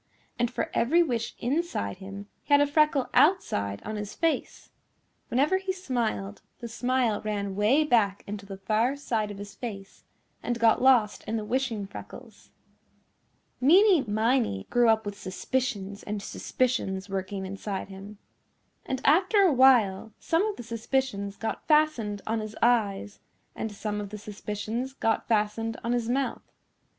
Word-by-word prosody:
And 240 Hz, 0 st, +2 dB
for 320 Hz, +6 st, -3 dB
every 330 Hz, +9 st, +3 dB
wish 235 Hz, -7 st, -3 dB
inside 255 Hz, -, -2 dB
him 200 Hz, +1 st, -9 dB, 0.2 s
he 290 Hz, -, -12 dB
had -, -, +5 dB
a 290 Hz, -, +5 dB
freckle 290 Hz, -2 st, +2 dB
outside 100 Hz, -, +2 dB
on 215 Hz, 0 st, -4 dB
his 210 Hz, 0 st, -6 dB
face. 330 Hz, -1 st, -2 dB, 0.6 s
Whenever 285 Hz, +9 st, +2 dB
he 380 Hz, 0 st, -2 dB
smiled 235 Hz, -, -3 dB, 0.2 s
the 235 Hz, -, -7 dB
smile 245 Hz, -1 st, 0 dB
ran 200 Hz, -2 st, -3 dB
way 220 Hz, +10 st, +3 dB
back 220 Hz, -8 st, +2 dB
into 200 Hz, -1 st, -7 dB
the 195 Hz, -1 st, -7 dB
far 220 Hz, +7 st, +1 dB
side 225 Hz, -7 st, -2 dB
of 205 Hz, -, -7 dB
his 200 Hz, 0 st, -8 dB
face 195 Hz, -5 st, -8 dB, 0.4 s
and 240 Hz, -, -2 dB
got 230 Hz, 0 st, +4 dB
lost 245 Hz, -5 st, +4 dB
in 225 Hz, -, -2 dB
the 215 Hz, -, -4 dB
wishing 235 Hz, -3 st, -1 dB
freckles. 195 Hz, -, -11 dB, 1.1 s
Meeny 355 Hz, +6 st, +6 dB
Miney 220 Hz, -, 0 dB
grew 240 Hz, -1 st, +4 dB
up 220 Hz, -1 st, +3 dB
with 200 Hz, 0 st, -6 dB
suspicions 200 Hz, 0 st, -3 dB
and 210 Hz, 0 st, -4 dB
suspicions 195 Hz, -8 st, -1 dB
working 195 Hz, 0 st, -4 dB
inside 195 Hz, 0 st, -5 dB
him. 195 Hz, +2 st, -10 dB, 0.7 s
And 260 Hz, -1 st, -2 dB
after 370 Hz, +7 st, +4 dB
a 370 Hz, -6 st, +5 dB
while 230 Hz, -6 st, +4 dB
some 330 Hz, +3 st, +1 dB
of 425 Hz, -, -3 dB
the -, -, -8 dB
suspicions 230 Hz, -3 st, -2 dB
got 225 Hz, -, -4 dB
fastened 300 Hz, -10 st, +2 dB
on 225 Hz, +1 st, -1 dB
his 215 Hz, 0 st, -6 dB
eyes 205 Hz, -4 st, +1 dB, 0.4 s
and 220 Hz, -, -4 dB
some 210 Hz, 0 st, -4 dB
of 205 Hz, -, -6 dB
the 210 Hz, -, -7 dB
suspicions 210 Hz, +5 st, -5 dB
got 225 Hz, -4 st, 0 dB
fastened 225 Hz, +1 st, 0 dB
on 235 Hz, -, -1 dB
his 240 Hz, -1 st, 0 dB
mouth. 270 Hz, +2 st, -1 dB
225 Hz, 155 wpm, -27 LUFS, 205-260 Hz, 1.1 s, Meeny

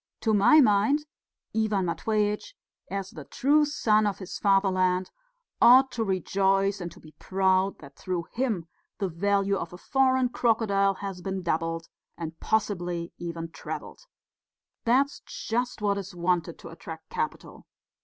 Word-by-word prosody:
To 220 Hz, -, +1 dB
my 235 Hz, +10 st, +6 dB
mind, 225 Hz, +6 st, +3 dB, 0.5 s
Ivan 215 Hz, -4 st, +1 dB
Matveitch, 210 Hz, -, -1 dB, 0.3 s
as 195 Hz, -1 st, -4 dB
the 155 Hz, -, -9 dB
true 295 Hz, -, +2 dB
son 215 Hz, -7 st, +2 dB
of 200 Hz, -, -2 dB
his 190 Hz, -2 st, -7 dB
fatherland, 185 Hz, -2 st, +2 dB, 0.5 s
ought 260 Hz, +2 st, +7 dB
to 230 Hz, -, -2 dB
rejoice 195 Hz, +1 st, +1 dB
and 175 Hz, -1 st, -5 dB
to -, -, -16 dB
be 155 Hz, -, -15 dB
proud 190 Hz, 0 st, +1 dB
that 140 Hz, -2 st, -14 dB
through 180 Hz, -2 st, -3 dB
him 230 Hz, -9 st, -1 dB, 0.3 s
the 195 Hz, -, -1 dB
value 200 Hz, +3 st, +1 dB
of 170 Hz, -, -6 dB
a -, -, -8 dB
foreign 260 Hz, +3 st, +2 dB
crocodile 210 Hz, -5 st, +2 dB
has 195 Hz, -2 st, -6 dB
been 190 Hz, 0 st, -4 dB
doubled 165 Hz, 0 st, -1 dB, 0.3 s
and 160 Hz, -1 st, -6 dB
possibly 175 Hz, -5 st, -1 dB
even 165 Hz, -1 st, -5 dB
trebled. -, -, -8 dB, 0.8 s
That's 270 Hz, +5 st, +2 dB
just 240 Hz, -1 st, -3 dB
what 200 Hz, -1 st, +1 dB
is 195 Hz, -1 st, -8 dB
wanted 175 Hz, -1 st, 0 dB
to -, -, -11 dB
attract 160 Hz, -1 st, -10 dB
capital. 155 Hz, -, -5 dB
195 Hz, 145 wpm, -27 LUFS, 175-220 Hz, 0.8 s, ought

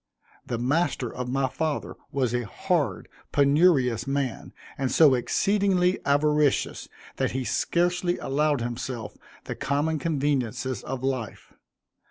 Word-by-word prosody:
The 120 Hz, -, -3 dB
master 130 Hz, 0 st, 0 dB
of 125 Hz, 0 st, -4 dB
my 135 Hz, +1 st, +1 dB
father 155 Hz, +2 st, -3 dB, 0.2 s
was 130 Hz, -4 st, 0 dB
a 120 Hz, -2 st, -1 dB
hard, 150 Hz, -, -1 dB, 0.2 s
penurious 140 Hz, -5 st, +3 dB
man, 135 Hz, -3 st, -2 dB, 0.2 s
and 135 Hz, -2 st, -2 dB
so 150 Hz, -4 st, +6 dB
exceedingly 190 Hz, -, +2 dB
avaricious, 150 Hz, 0 st, +2 dB, 0.3 s
that -, -, 0 dB
he 130 Hz, 0 st, -1 dB
scarcely 175 Hz, +5 st, 0 dB
allowed 145 Hz, -1 st, 0 dB
himself 120 Hz, -1 st, -4 dB, 0.3 s
the -, -, -5 dB
common 150 Hz, +3 st, -1 dB
conveniences 135 Hz, -5 st, -1 dB
of 130 Hz, -1 st, -5 dB
life. 130 Hz, -5 st, -4 dB
140 Hz, 120 wpm, -26 LUFS, 125-155 Hz, 0.3 s, so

